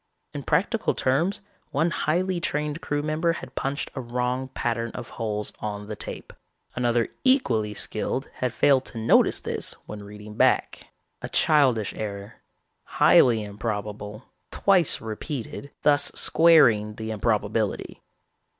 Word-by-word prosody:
In 145 Hz, -, -4 dB
practical 190 Hz, -, 0 dB
terms, 165 Hz, +10 st, 0 dB, 0.3 s
one 160 Hz, +5 st, +1 dB
highly 175 Hz, +3 st, 0 dB
trained 150 Hz, 0 st, -2 dB
crew 145 Hz, -4 st, -2 dB
member 155 Hz, +2 st, 0 dB
had -, -, -9 dB
punched 140 Hz, +1 st, -3 dB
a 130 Hz, -, -4 dB
wrong 125 Hz, +2 st, -2 dB
pattern 115 Hz, -2 st, -2 dB
of 120 Hz, -2 st, -7 dB
holes 105 Hz, -2 st, -3 dB
on 105 Hz, -1 st, -5 dB
the 105 Hz, +1 st, -6 dB
tape. -, -, -8 dB, 0.4 s
Another 120 Hz, -1 st, +1 dB
equally 115 Hz, -, +2 dB
skilled 130 Hz, +7 st, -1 dB
had 125 Hz, -1 st, -1 dB
failed 135 Hz, +2 st, +3 dB
to 115 Hz, -, -7 dB
notice 110 Hz, +1 st, +3 dB
this -, -, -3 dB
when 105 Hz, -1 st, -8 dB
reading 105 Hz, +1 st, -10 dB
back. -, -, +1 dB, 0.3 s
A -, -, -5 dB
childish 130 Hz, -9 st, +2 dB
error, 100 Hz, -2 st, -6 dB, 0.6 s
highly 115 Hz, -4 st, +5 dB
improbable; 105 Hz, +1 st, -5 dB, 0.3 s
twice 185 Hz, -5 st, +3 dB
repeated, 120 Hz, +4 st, -6 dB
thus 145 Hz, -1 st, +3 dB
squaring 120 Hz, -11 st, +4 dB
the 110 Hz, 0 st, -5 dB
improbability. 110 Hz, 0 st, -1 dB
120 Hz, 130 wpm, -25 LUFS, 105-150 Hz, 0.6 s, highly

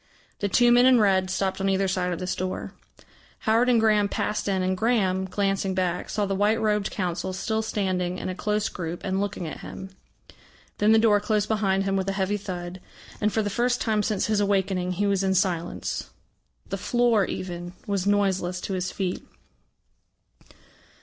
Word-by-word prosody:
The 200 Hz, -, -1 dB
two 240 Hz, +4 st, +4 dB
men 245 Hz, +1 st, +6 dB
in 255 Hz, -2 st, +6 dB
red 190 Hz, -3 st, +3 dB
stopped 190 Hz, 0 st, -1 dB
on 195 Hz, -, +1 dB
either 195 Hz, 0 st, +1 dB
side 185 Hz, -1 st, -1 dB
of 175 Hz, -, -2 dB
this 185 Hz, +1 st, -2 dB
door. 185 Hz, 0 st, -4 dB, 0.7 s
Howard 230 Hz, +3 st, +3 dB
and 240 Hz, -2 st, +4 dB
Graham 210 Hz, -2 st, +3 dB
passed 210 Hz, -, -2 dB
in, 190 Hz, -2 st, +1 dB
and 185 Hz, 0 st, +1 dB
Graham, 190 Hz, -4 st, +1 dB
glancing 195 Hz, 0 st, -1 dB
back, 180 Hz, -2 st, -1 dB
saw 210 Hz, -1 st, 0 dB
the 195 Hz, -, -2 dB
white 205 Hz, +3 st, +2 dB
robed 210 Hz, -2 st, +1 dB
Council 185 Hz, 0 st, -3 dB
still 220 Hz, +4 st, -1 dB
standing 185 Hz, -4 st, -1 dB
in -, -, -5 dB
a 185 Hz, -, -2 dB
close 210 Hz, +3 st, -1 dB
group 170 Hz, -1 st, -5 dB
and 190 Hz, 0 st, -1 dB
looking 200 Hz, -3 st, -3 dB
at -, -, -7 dB
him. 190 Hz, 0 st, -9 dB, 0.9 s
Then 210 Hz, +1 st, +4 dB
the 220 Hz, -, +6 dB
door 220 Hz, -2 st, +4 dB
closed 210 Hz, 0 st, 0 dB
behind 195 Hz, -3 st, +1 dB
him 195 Hz, 0 st, 0 dB
with 190 Hz, 0 st, 0 dB
a -, -, -1 dB
heavy 195 Hz, +1 st, 0 dB
thud, 180 Hz, -2 st, -6 dB, 0.4 s
and 210 Hz, 0 st, +2 dB
for 220 Hz, -, 0 dB
the 205 Hz, -, -2 dB
first 245 Hz, +3 st, +1 dB
time 215 Hz, -2 st, +1 dB
since 205 Hz, -1 st, 0 dB
his 215 Hz, -1 st, +1 dB
awakening 190 Hz, -2 st, 0 dB
he 200 Hz, +3 st, 0 dB
was 200 Hz, -1 st, +1 dB
in 190 Hz, 0 st, +1 dB
silence. 180 Hz, -3 st, -1 dB, 0.6 s
The -, -, -2 dB
floor, 240 Hz, -5 st, +2 dB
even, 175 Hz, -1 st, -5 dB
was 200 Hz, -2 st, -1 dB
noiseless 190 Hz, -3 st, +1 dB
to 195 Hz, -, -4 dB
his 185 Hz, -1 st, -2 dB
feet. 185 Hz, -2 st, -3 dB
195 Hz, 190 wpm, -25 LUFS, 185-210 Hz, 0.9 s, men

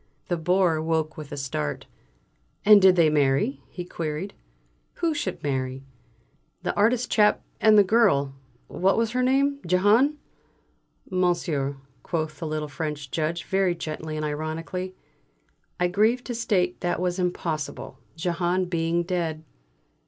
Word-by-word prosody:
The 175 Hz, -, +1 dB
Bore 175 Hz, -1 st, +2 dB
woke 160 Hz, -1 st, -1 dB
with 155 Hz, -2 st, -9 dB
a 145 Hz, -, -5 dB
start. 75 Hz, -, -3 dB, 0.8 s
"And 210 Hz, -1 st, +8 dB
did 190 Hz, -1 st, +7 dB
they 165 Hz, -3 st, +4 dB
marry?" 145 Hz, -, +1 dB
he 180 Hz, -, -7 dB
queried. 165 Hz, +3 st, -4 dB, 0.6 s
"Who 335 Hz, -2 st, 0 dB
should 205 Hz, -11 st, -4 dB
marry?" 130 Hz, -2 st, -2 dB, 0.8 s
"That -, -, -2 dB
artist 235 Hz, +4 st, +2 dB
chap 210 Hz, -1 st, +3 dB, 0.2 s
and 215 Hz, -1 st, +6 dB
the 205 Hz, -, +8 dB
girl 185 Hz, -10 st, +3 dB, 0.3 s
what 190 Hz, +2 st, +1 dB
was 230 Hz, -1 st, +1 dB
her 250 Hz, +1 st, 0 dB
name? 275 Hz, +2 st, +2 dB
Jehane." 210 Hz, -, +3 dB, 0.9 s
"Monsieur," 170 Hz, -6 st, 0 dB, 0.2 s
quoth 155 Hz, -3 st, -3 dB
the 160 Hz, -, -4 dB
little 155 Hz, 0 st, -3 dB
French 145 Hz, -1 st, -5 dB
Judge 165 Hz, +2 st, -1 dB
very 190 Hz, -2 st, +1 dB
gently 155 Hz, -1 st, -5 dB
and 155 Hz, 0 st, -2 dB
ironically, 160 Hz, +5 st, -4 dB, 0.8 s
"I 180 Hz, -, +3 dB
grieve 220 Hz, +7 st, +2 dB
to 245 Hz, -, -5 dB
state 195 Hz, -6 st, 0 dB
that 175 Hz, -2 st, -1 dB
was 180 Hz, 0 st, -1 dB
impossible, 165 Hz, -4 st, -3 dB, 0.2 s
Jehane 175 Hz, +2 st, 0 dB
being 170 Hz, -1 st, 0 dB
dead." 165 Hz, -3 st, -2 dB
175 Hz, 140 wpm, -25 LUFS, 155-195 Hz, 0.9 s, And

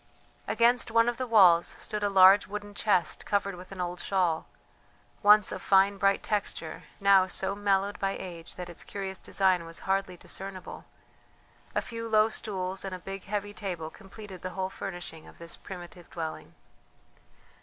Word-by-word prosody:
Against 240 Hz, +1 st, +3 dB
one 230 Hz, +1 st, +4 dB
of 240 Hz, -, 0 dB
the 255 Hz, -, -3 dB
walls 185 Hz, -7 st, +6 dB
stood 210 Hz, -, -4 dB
a 205 Hz, -, +1 dB
large 195 Hz, +1 st, +7 dB
wooden 205 Hz, 0 st, -6 dB
chest 200 Hz, -4 st, +1 dB
covered 200 Hz, -1 st, 0 dB
with 180 Hz, +1 st, -11 dB
an 195 Hz, -, -9 dB
old 180 Hz, 0 st, -3 dB
shawl, 180 Hz, -5 st, 0 dB, 0.7 s
once 210 Hz, +1 st, +6 dB
of -, -, -5 dB
fine 195 Hz, 0 st, +4 dB
bright 195 Hz, 0 st, +2 dB
texture, 200 Hz, -6 st, -3 dB
now 195 Hz, -1 st, +5 dB
so 190 Hz, +1 st, -1 dB
mellowed 200 Hz, 0 st, 0 dB
by 195 Hz, 0 st, 0 dB
age 170 Hz, -3 st, -9 dB
that 180 Hz, -1 st, -6 dB
its 175 Hz, -, -10 dB
curious 190 Hz, -1 st, -5 dB
design 185 Hz, -3 st, +2 dB
was 165 Hz, 0 st, -7 dB
hardly 195 Hz, -1 st, -1 dB
discernible; 190 Hz, +1 st, -7 dB, 0.9 s
a -, -, +1 dB
few 230 Hz, 0 st, -6 dB
low 215 Hz, 0 st, +4 dB
stools 190 Hz, -4 st, -4 dB
and 195 Hz, -1 st, -4 dB
a 180 Hz, -, -12 dB
big 195 Hz, 0 st, -6 dB
heavy 205 Hz, +1 st, -3 dB
table 175 Hz, -6 st, -5 dB
completed 195 Hz, -2 st, -11 dB
the 185 Hz, -, -4 dB
whole 190 Hz, 0 st, -2 dB
furnishing 175 Hz, -5 st, -7 dB
of -, -, -15 dB
this 170 Hz, 0 st, -5 dB
primitive 175 Hz, -2 st, -10 dB
dwelling. 160 Hz, -2 st, -6 dB
195 Hz, 165 wpm, -29 LUFS, 180-205 Hz, 0.9 s, large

